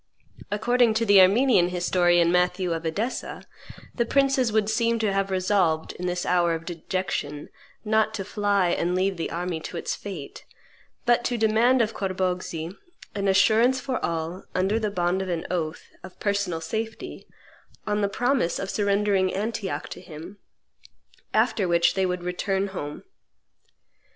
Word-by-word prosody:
According 230 Hz, +2 st, +2 dB
to 230 Hz, +1 st, +1 dB
the 200 Hz, -2 st, +7 dB
Armenian 195 Hz, -1 st, +4 dB
historian 175 Hz, -1 st, +3 dB
Matthew 180 Hz, 0 st, +1 dB
of 165 Hz, 0 st, -4 dB
Edessa, 215 Hz, +10 st, -3 dB, 0.5 s
the 235 Hz, -, +1 dB
princes 270 Hz, -1 st, +2 dB
would 215 Hz, -1 st, +2 dB
seem 230 Hz, +1 st, +1 dB
to 215 Hz, -3 st, 0 dB
have 195 Hz, 0 st, 0 dB
resolved, 185 Hz, -4 st, +1 dB
in 180 Hz, -, -5 dB
this 180 Hz, 0 st, -2 dB
hour 175 Hz, -2 st, +2 dB
of 165 Hz, 0 st, -7 dB
dejection, 170 Hz, -4 st, -4 dB, 0.4 s
not 220 Hz, 0 st, +2 dB
to 195 Hz, -3 st, -4 dB
fly 205 Hz, -2 st, +1 dB
and 175 Hz, +1 st, 0 dB
leave 190 Hz, +1 st, +1 dB
the 165 Hz, -, -3 dB
army 175 Hz, 0 st, -3 dB
to 170 Hz, -, -7 dB
its -, -, -2 dB
fate, 180 Hz, -9 st, -8 dB, 0.6 s
but 240 Hz, 0 st, +3 dB
"to 245 Hz, -, 0 dB
demand 230 Hz, +3 st, +3 dB
of 220 Hz, -, -3 dB
Corboghzi 185 Hz, -3 st, -3 dB, 0.4 s
an 200 Hz, -1 st, -2 dB
assurance 220 Hz, +7 st, +4 dB
for 260 Hz, -2 st, -3 dB
all, 165 Hz, +2 st, -3 dB
under 190 Hz, +4 st, +1 dB
the 215 Hz, -2 st, -1 dB
bond 180 Hz, -1 st, 0 dB
of 190 Hz, -, -4 dB
an 170 Hz, -2 st, -2 dB
oath, 160 Hz, -3 st, -3 dB
of 185 Hz, 0 st, -12 dB
personal 200 Hz, -5 st, -1 dB
safety, 220 Hz, +5 st, -5 dB, 0.6 s
on 210 Hz, 0 st, 0 dB
the 200 Hz, -, +1 dB
promise 245 Hz, -3 st, 0 dB
of 195 Hz, -, -4 dB
surrendering 200 Hz, -2 st, +1 dB
Antioch 200 Hz, -6 st, -3 dB
to -, -, -8 dB
him; 170 Hz, +6 st, -10 dB, 0.9 s
after 195 Hz, -4 st, +2 dB
which 170 Hz, 0 st, +3 dB
they 190 Hz, -1 st, +1 dB
would 180 Hz, -1 st, -3 dB
return 190 Hz, +2 st, -1 dB
home." 150 Hz, -6 st, -6 dB
190 Hz, 155 wpm, -25 LUFS, 175-215 Hz, 0.9 s, the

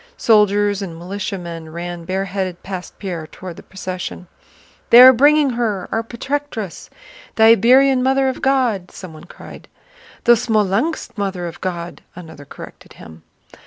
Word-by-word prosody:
Soldiers 205 Hz, -2 st, +2 dB
and 170 Hz, -4 st, -7 dB
militiamen 175 Hz, -3 st, -6 dB
ran 170 Hz, 0 st, -7 dB
bareheaded 190 Hz, -1 st, -4 dB
past 185 Hz, -2 st, -8 dB
Pierre 175 Hz, -5 st, -6 dB
toward 180 Hz, +1 st, -10 dB
the -, -, -10 dB
procession. 185 Hz, -1 st, -7 dB, 0.6 s
"They 235 Hz, -, +8 dB
are 260 Hz, +1 st, +10 dB
bringing 290 Hz, +2 st, +4 dB
her, 220 Hz, -6 st, -2 dB
our 225 Hz, -, 0 dB
Protectress!... 235 Hz, -, -5 dB, 0.5 s
The 220 Hz, -, +3 dB
Iberian 255 Hz, +4 st, +5 dB
Mother 265 Hz, +1 st, +2 dB
of 260 Hz, -, -3 dB
God!" 250 Hz, -9 st, 0 dB
someone 165 Hz, -3 st, -11 dB
cried. -, -, -13 dB, 0.6 s
"The 240 Hz, -, +4 dB
Smolénsk 220 Hz, -, -1 dB
Mother 190 Hz, -3 st, -3 dB
of 170 Hz, 0 st, -8 dB
God," 175 Hz, -2 st, -5 dB
another 160 Hz, -5 st, -11 dB
corrected -, -, -13 dB
him. 80 Hz, 0 st, -14 dB
195 Hz, 135 wpm, -19 LUFS, 175-240 Hz, 0.6 s, are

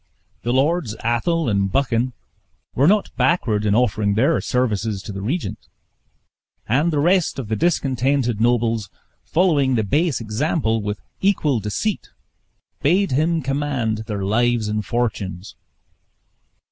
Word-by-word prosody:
The 120 Hz, -, -1 dB
Lords 135 Hz, -2 st, +1 dB
Athol 155 Hz, +7 st, +1 dB
and 100 Hz, -3 st, +1 dB
Buchan 125 Hz, -1 st, 0 dB, 0.6 s
were 140 Hz, +4 st, +3 dB
not 205 Hz, +2 st, +2 dB
backward 110 Hz, -11 st, +1 dB
in 100 Hz, -, +3 dB
offering 105 Hz, -4 st, +1 dB
their 140 Hz, +9 st, +2 dB
services 110 Hz, -5 st, -1 dB
to -, -, -7 dB
the 100 Hz, 0 st, -6 dB
regent; 145 Hz, -, -3 dB, 1.0 s
and 145 Hz, +9 st, +2 dB
the 150 Hz, -, -1 dB
rest 175 Hz, +3 st, +2 dB
of 125 Hz, -6 st, -5 dB
the 110 Hz, -, 0 dB
discontented 130 Hz, -6 st, 0 dB
nobles, 115 Hz, -3 st, +1 dB, 0.3 s
following 150 Hz, -7 st, +2 dB
the 110 Hz, -, +1 dB
base 150 Hz, -, +1 dB
example, 115 Hz, +1 st, -1 dB
with 105 Hz, -2 st, -4 dB, 0.2 s
equal 155 Hz, -, +2 dB
deceit 105 Hz, -, -3 dB, 0.7 s
bade 185 Hz, +7 st, +2 dB
him 160 Hz, +4 st, +1 dB
command 130 Hz, -6 st, -1 dB
their 105 Hz, -3 st, -3 dB
lives 115 Hz, +1 st, +1 dB
and 105 Hz, 0 st, -1 dB
fortunes. 110 Hz, -4 st, -3 dB
120 Hz, 130 wpm, -21 LUFS, 110-150 Hz, 1.0 s, were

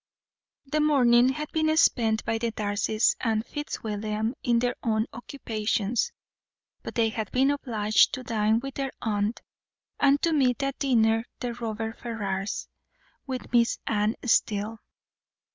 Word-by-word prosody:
The 305 Hz, +3 st, -1 dB
morning 255 Hz, -5 st, +5 dB
had 300 Hz, +3 st, -4 dB
been 315 Hz, 0 st, +1 dB
spent 225 Hz, -7 st, +3 dB
by 225 Hz, 0 st, 0 dB
the 230 Hz, 0 st, -1 dB
Darcys 215 Hz, +1 st, +1 dB
and 220 Hz, -1 st, 0 dB
Fitzwilliam 220 Hz, -6 st, -3 dB
in 240 Hz, -1 st, +2 dB
their 245 Hz, +1 st, 0 dB
own 220 Hz, -2 st, +1 dB
occupations; 225 Hz, -3 st, -2 dB, 0.7 s
but -, -, -8 dB
they 225 Hz, -1 st, +3 dB
had 220 Hz, -1 st, -4 dB
been 270 Hz, +2 st, +3 dB
obliged 220 Hz, -7 st, +2 dB
to 255 Hz, -, -8 dB
dine 220 Hz, -1 st, +1 dB
with 270 Hz, +1 st, -6 dB
their 270 Hz, 0 st, -3 dB
aunt, 210 Hz, 0 st, -1 dB, 0.6 s
and 280 Hz, 0 st, +4 dB
to 335 Hz, -, +2 dB
meet 270 Hz, -2 st, +2 dB
at 275 Hz, 0 st, -2 dB
dinner 225 Hz, -4 st, +2 dB
the 245 Hz, -1 st, -3 dB
Robert 225 Hz, -1 st, -4 dB
Ferrars, 200 Hz, -4 st, -3 dB, 0.6 s
with 260 Hz, -2 st, -5 dB
Miss 235 Hz, -1 st, +3 dB
Anne 210 Hz, 0 st, +1 dB
Steele. 215 Hz, -1 st, +1 dB
230 Hz, 140 wpm, -26 LUFS, 220-260 Hz, 0.7 s, morning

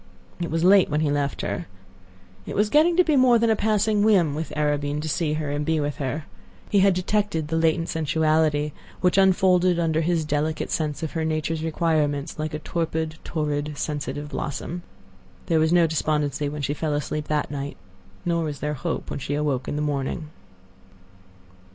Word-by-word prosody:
It 170 Hz, -1 st, -2 dB
was 165 Hz, +1 st, 0 dB
late 190 Hz, 0 st, +6 dB
when 150 Hz, +1 st, 0 dB
he 150 Hz, -2 st, +1 dB
left 145 Hz, -1 st, -1 dB
her. 100 Hz, -, -3 dB, 0.8 s
It -, -, -5 dB
was 210 Hz, +1 st, +2 dB
getting 330 Hz, +3 st, +4 dB
to 360 Hz, -, +7 dB
be 315 Hz, -4 st, +2 dB
more 255 Hz, -3 st, +6 dB
than 230 Hz, 0 st, +2 dB
a -, -, +4 dB
passing 215 Hz, 0 st, +1 dB
whim 190 Hz, -8 st, +4 dB
with 155 Hz, +2 st, -4 dB
Arobin 145 Hz, -1 st, 0 dB
to 160 Hz, -, -4 dB
see 155 Hz, 0 st, 0 dB
her 155 Hz, -2 st, -2 dB
and 145 Hz, +1 st, -1 dB
be 160 Hz, +1 st, +1 dB
with 145 Hz, -1 st, -2 dB
her. 140 Hz, +3 st, -3 dB, 0.5 s
He 205 Hz, -, +4 dB
had 195 Hz, -1 st, +4 dB
detected 185 Hz, -4 st, -1 dB
the 160 Hz, -, -1 dB
latent 165 Hz, +1 st, +2 dB
sensuality, 155 Hz, -1 st, +1 dB, 0.3 s
which 180 Hz, +1 st, +3 dB
unfolded 185 Hz, -2 st, +4 dB
under 160 Hz, -2 st, +1 dB
his 165 Hz, -1 st, 0 dB
delicate 150 Hz, +1 st, -1 dB
sense 150 Hz, -2 st, -2 dB
of 160 Hz, -, -3 dB
her 160 Hz, -2 st, -2 dB
nature's 160 Hz, 0 st, -1 dB
requirements 155 Hz, -2 st, 0 dB
like 155 Hz, 0 st, -2 dB
a 155 Hz, -, -8 dB
torpid, 160 Hz, -1 st, -2 dB
torrid, 150 Hz, -2 st, -2 dB
sensitive 145 Hz, 0 st, -3 dB
blossom. 155 Hz, +4 st, -4 dB, 0.6 s
There 165 Hz, -3 st, +2 dB
was 160 Hz, +1 st, +2 dB
no 175 Hz, -1 st, +5 dB
despondency 150 Hz, -2 st, 0 dB
when 145 Hz, 0 st, -5 dB
she 140 Hz, -, 0 dB
fell 150 Hz, 0 st, -2 dB
asleep 150 Hz, +1 st, -3 dB
that 150 Hz, -1 st, -1 dB
night; 140 Hz, 0 st, -5 dB, 0.5 s
nor 170 Hz, -1 st, +1 dB
was 150 Hz, -2 st, -4 dB
there 150 Hz, 0 st, -2 dB
hope 160 Hz, +4 st, -4 dB
when -, -, -3 dB
she 145 Hz, +2 st, -3 dB
awoke 145 Hz, -4 st, -1 dB
in -, -, -2 dB
the 150 Hz, -, -1 dB
morning. 145 Hz, +1 st, -2 dB
155 Hz, 190 wpm, -24 LUFS, 150-175 Hz, 0.8 s, to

